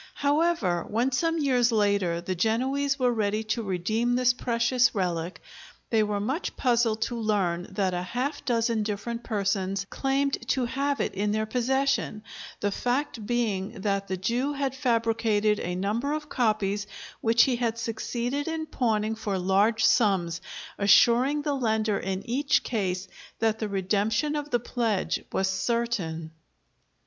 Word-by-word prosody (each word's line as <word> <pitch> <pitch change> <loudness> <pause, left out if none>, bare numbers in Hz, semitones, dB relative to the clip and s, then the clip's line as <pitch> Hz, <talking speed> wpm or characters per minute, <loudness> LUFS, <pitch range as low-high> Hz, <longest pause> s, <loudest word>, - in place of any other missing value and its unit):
However, 285 - +1
when 235 +5 +1
some 330 +6 +1
years 250 -5 +2
later 200 -6 +1
the 185 +2 -3
Genoese 260 +9 0
were 250 -3 +2
ready 215 -1 0
to 235 - -3
redeem 215 +5 0
this 250 0 +3
precious 240 0 +1
relic, 175 -2 -2 0.5
they 225 -2 +4
were 210 -1 0
much 265 - -3
puzzled 235 -3 +2
to 240 - -3
learn 190 -5 0
that 190 -2 0
a 175 - -1
half 250 +10 -3
dozen 230 -2 +1
different 215 +3 -3
persons 195 -2 -1
claimed 275 +1 0
to 255 0 +1
have 275 +2 -1
it - - -1
in 205 +2 -1
their 215 0 0
possession, 260 -1 0 0.4
the 205 - +1
fact 245 -1 -2
being 215 -3 -1
that 200 0 -1
the 190 0 -2
Jew 240 +9 -1
had 275 -2 -1
fabricated 225 -4 +1
a 180 +1 -3
number 215 +10 -1
of 305 0 -4
copies 210 -4 0 0.3
which 230 +1 +5
he 255 -3 +1
had 230 -2 -1
succeeded 240 +5 -3
in 320 -1 -2
pawning 220 -6 0
for 210 -3 -3
large 195 +5 +2
sums, 185 -7 +2 0.4
assuring 240 +8 +5
the 290 - 0
lender 220 -5 0
in 190 0 -4
each 275 +4 +2
case 190 -4 -2 0.3
that 220 -1 +1
the 215 - -2
redemption 210 +9 0
of 295 0 -3
the 240 - +1
pledge 230 -4 -1
was 190 - +1
certain. 190 -6 -1
225 Hz, 150 wpm, -27 LUFS, 200-250 Hz, 0.5 s, which